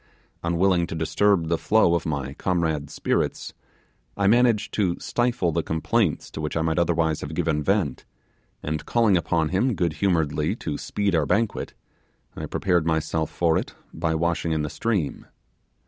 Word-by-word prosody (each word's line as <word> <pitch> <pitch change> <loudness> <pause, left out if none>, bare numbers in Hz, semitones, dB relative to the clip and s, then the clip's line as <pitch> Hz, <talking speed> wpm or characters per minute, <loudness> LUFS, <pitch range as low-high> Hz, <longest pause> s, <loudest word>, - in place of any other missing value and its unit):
Unwilling 85 +1 +2
to - - -5
disturb 85 +2 +2
the 85 0 0
flow 110 -5 +3
of 85 -1 0
my 70 -3 -3
comrade's 80 -4 -1
spirits, - - -1 0.6
I 100 - +1
managed 115 0 +3
to 95 -5 +1
stifle 120 -7 0
the 85 +1 0
complaints 80 +3 0
to - - -6
which 75 +1 -2
I 80 - +1
might 80 +1 +1
otherwise 80 -2 +1
have 75 +2 -6
given 80 -3 0
vent, 95 -1 0 0.6
and 75 0 -3
calling 115 -5 +3
upon 85 -2 +1
him 115 +7 +1
good 85 -4 0
humouredly 80 -5 +1
to 75 - -4
speed 100 -2 -1
our 80 -4 +2
banquet, 115 +5 -1 0.6
I - - -5
prepared 90 -4 +1
myself 80 0 0
for 85 -2 +1
it - - -7 0.2
by 80 0 -1
washing 85 0 0
in 80 -1 0
the 75 - -4
stream. 100 -11 -2
85 Hz, 165 wpm, -24 LUFS, 80-95 Hz, 0.6 s, flow